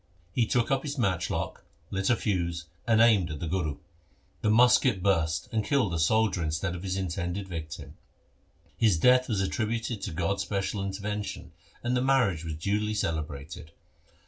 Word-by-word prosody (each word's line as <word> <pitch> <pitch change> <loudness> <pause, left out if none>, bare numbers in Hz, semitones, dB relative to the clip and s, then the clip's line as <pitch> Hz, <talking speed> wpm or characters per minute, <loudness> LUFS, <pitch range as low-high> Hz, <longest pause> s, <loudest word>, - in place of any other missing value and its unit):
He 115 +1 +2
took 120 +2 +1
up 135 -1 +2
his 145 0 -5
matchlock, 95 -7 -1 0.3
lit 95 0 0
a 120 - +5
fuse, 85 -6 -1 0.2
and 110 -1 +4
aimed 110 -7 +5
at 75 -2 -5
the - - -3
Guru. 80 -4 -1 0.6
The 105 - +1
musket 120 -3 +4
burst, 80 -6 +1
and 110 -2 0
killed 125 -7 +1
the 85 - -1
soldier 110 +2 +2
instead 80 +4 -1
of 90 - -6
his 95 0 -2
intended 95 +1 -3
victim. 80 -4 -7 0.8
His 105 -7 +3
death 125 +8 +4
was 105 -4 +1
attributed 110 +2 -2
to 95 - -4
God's 90 +4 -1
special 100 0 -2
intervention, 100 +1 -4 0.3
and 120 +1 0
the 125 - +2
marriage 125 -11 +2
was 80 -2 -4
duly 105 +6 -1
celebrated. 80 -3 -4
95 Hz, 165 wpm, -28 LUFS, 85-110 Hz, 0.8 s, a